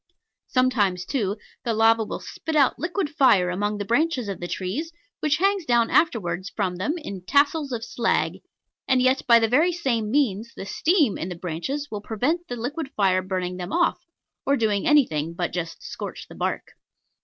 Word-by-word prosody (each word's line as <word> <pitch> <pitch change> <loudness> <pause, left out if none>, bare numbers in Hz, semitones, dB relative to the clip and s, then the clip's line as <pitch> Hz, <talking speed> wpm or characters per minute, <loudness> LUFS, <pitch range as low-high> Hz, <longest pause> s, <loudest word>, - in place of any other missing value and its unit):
Sometimes, 210 -9 +1
too, 205 -2 -1 0.3
the 230 -2 -1
lava 225 +1 +4
will - - -5
spit 320 - -6
out 280 -3 +3
liquid 350 +1 -1
fire 245 - +3
among 205 +3 -1
the 205 - -4
branches 255 +1 +1
of 195 -3 -4
the 175 - -4
trees, 220 - -3 0.3
which 300 -1 +1
hangs 390 +1 +2
down 240 -5 +2
afterwards 190 - +1
from 185 -4 -2
them 205 - -1
in 200 - -7
tassels 285 - +2
of 230 -2 -3
slag, 235 -1 0 0.5
and 260 -1 +3
yet, 255 +1 +3
by 235 -1 +8
the 225 -1 +3
very 300 +10 +3
same 255 -11 -1
means, 230 -4 0
the - - -7
steam 305 - +2
in 175 - -3
the 180 - -5
branches 180 - -4
will 210 -1 -4
prevent 275 +12 -1
the 245 - -4
liquid 270 +5 -4
fire 190 -2 +3
burning 185 -1 -3
them 180 +1 -6
off, 350 0 +2 0.4
or 280 0 +2
doing 210 -4 0
anything 170 - +2
but 175 0 -2
just 170 -2 -5
scorch - - -7
the - - -12
bark. - - -3
230 Hz, 185 wpm, -24 LUFS, 190-290 Hz, 0.5 s, by